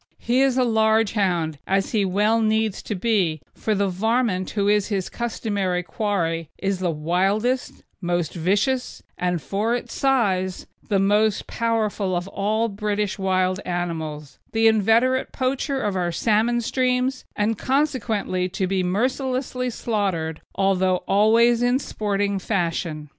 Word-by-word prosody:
He 245 Hz, +2 st, +1 dB
is 270 Hz, -2 st, +3 dB
a 255 Hz, -, +4 dB
large 220 Hz, -2 st, +3 dB
hound, 175 Hz, -8 st, 0 dB
as 195 Hz, 0 st, +1 dB
he 210 Hz, -4 st, +2 dB
well 210 Hz, +4 st, +2 dB
needs 220 Hz, -1 st, +1 dB
to 210 Hz, -, -4 dB
be, 185 Hz, -6 st, +1 dB
for 215 Hz, -, -1 dB
the 200 Hz, 0 st, +1 dB
"varmint" 205 Hz, 0 st, 0 dB
who 200 Hz, -1 st, -1 dB
is 205 Hz, -1 st, +3 dB
his 195 Hz, -4 st, -2 dB
customary 205 Hz, -6 st, -2 dB
quarry 165 Hz, -4 st, -2 dB
is 195 Hz, -1 st, -1 dB
the 185 Hz, -1 st, 0 dB
wildest, 195 Hz, +11 st, 0 dB, 0.2 s
most 175 Hz, -3 st, -1 dB
vicious, 205 Hz, +10 st, 0 dB
and, 180 Hz, -1 st, -1 dB
for 205 Hz, -, -1 dB
its 245 Hz, -, -5 dB
size, 195 Hz, -9 st, +1 dB, 0.2 s
the 200 Hz, -, +3 dB
most 205 Hz, +2 st, +2 dB
powerful 215 Hz, -5 st, -1 dB
of 175 Hz, +1 st, -2 dB
all 215 Hz, +4 st, 0 dB
British 210 Hz, -1 st, -2 dB
wild 185 Hz, -1 st, +1 dB
animals, 160 Hz, -4 st, -4 dB
the 225 Hz, 0 st, +2 dB
inveterate 225 Hz, +4 st, +3 dB
poacher 270 Hz, +2 st, -1 dB
of 205 Hz, -5 st, -1 dB
our 175 Hz, -2 st, 0 dB
salmon 225 Hz, +6 st, +1 dB
streams, 255 Hz, +2 st, 0 dB
and 210 Hz, +1 st, 0 dB
consequently 240 Hz, -10 st, 0 dB
to 190 Hz, +1 st, -2 dB
be 190 Hz, 0 st, 0 dB
mercilessly 250 Hz, +6 st, -1 dB
slaughtered, 195 Hz, -9 st, -2 dB
although 185 Hz, -1 st, +1 dB
always 230 Hz, +4 st, +4 dB
in 245 Hz, +1 st, +3 dB
sporting 205 Hz, -5 st, -1 dB
fashion. 170 Hz, -5 st, -2 dB
205 Hz, 140 wpm, -23 LUFS, 185-230 Hz, 0.2 s, a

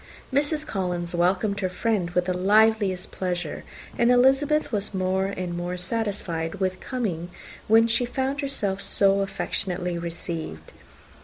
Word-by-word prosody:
Mrs. 295 Hz, +2 st, +1 dB
Collins 180 Hz, -3 st, -2 dB
welcomed 185 Hz, +4 st, +1 dB
her 185 Hz, -2 st, 0 dB
friend 185 Hz, -1 st, 0 dB
with 180 Hz, 0 st, 0 dB
the 185 Hz, -, 0 dB
liveliest 205 Hz, -1 st, +3 dB
pleasure, 175 Hz, -4 st, -3 dB, 0.4 s
and 240 Hz, 0 st, +4 dB
Elizabeth 270 Hz, +4 st, +3 dB
was 205 Hz, -2 st, -2 dB
more 185 Hz, +1 st, +1 dB
and 185 Hz, -3 st, -4 dB
more 175 Hz, +1 st, -3 dB
satisfied 185 Hz, -4 st, -2 dB
with 185 Hz, -1 st, -1 dB
coming, 190 Hz, -10 st, -3 dB, 0.4 s
when 225 Hz, +1 st, +6 dB
she 230 Hz, +2 st, +2 dB
found 265 Hz, +3 st, -2 dB
herself 205 Hz, -9 st, -2 dB
so 195 Hz, 0 st, +3 dB
affectionately 180 Hz, -2 st, -2 dB
received. 165 Hz, -, -5 dB
190 Hz, 135 wpm, -25 LUFS, 180-225 Hz, 0.4 s, when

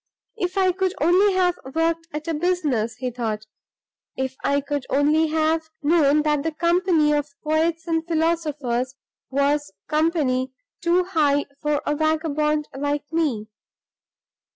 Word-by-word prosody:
"If 370 Hz, -3 st, -3 dB
I 375 Hz, -1 st, +4 dB
could 375 Hz, +1 st, -1 dB
only 370 Hz, +5 st, +4 dB
have 360 Hz, -1 st, +1 dB, 0.2 s
worked 330 Hz, 0 st, 0 dB
at 305 Hz, 0 st, -6 dB
a 330 Hz, -, 0 dB
business!" 295 Hz, -10 st, 0 dB
he 250 Hz, 0 st, -4 dB
thought. 220 Hz, -3 st, -3 dB, 0.7 s
"If 265 Hz, 0 st, -2 dB
I 280 Hz, 0 st, +2 dB
could 285 Hz, -1 st, -3 dB
only 300 Hz, +3 st, +3 dB
have 315 Hz, +1 st, 0 dB
known 300 Hz, -1 st, +4 dB
that 300 Hz, -1 st, +1 dB
the 325 Hz, +2 st, -1 dB
company 340 Hz, -1 st, +2 dB
of 295 Hz, 0 st, 0 dB
poets 320 Hz, +1 st, 0 dB
and 325 Hz, -1 st, 0 dB
philosophers 300 Hz, -7 st, -1 dB, 0.3 s
was 280 Hz, -1 st, +1 dB, 0.2 s
company 300 Hz, -5 st, +1 dB, 0.3 s
too 345 Hz, +1 st, +3 dB
high 300 Hz, -6 st, +2 dB, 0.2 s
for 295 Hz, -1 st, 0 dB
a 295 Hz, -, 0 dB
vagabond 305 Hz, -1 st, 0 dB
like 290 Hz, +1 st, -1 dB
me!" 260 Hz, -10 st, 0 dB
305 Hz, 135 wpm, -23 LUFS, 285-330 Hz, 0.7 s, I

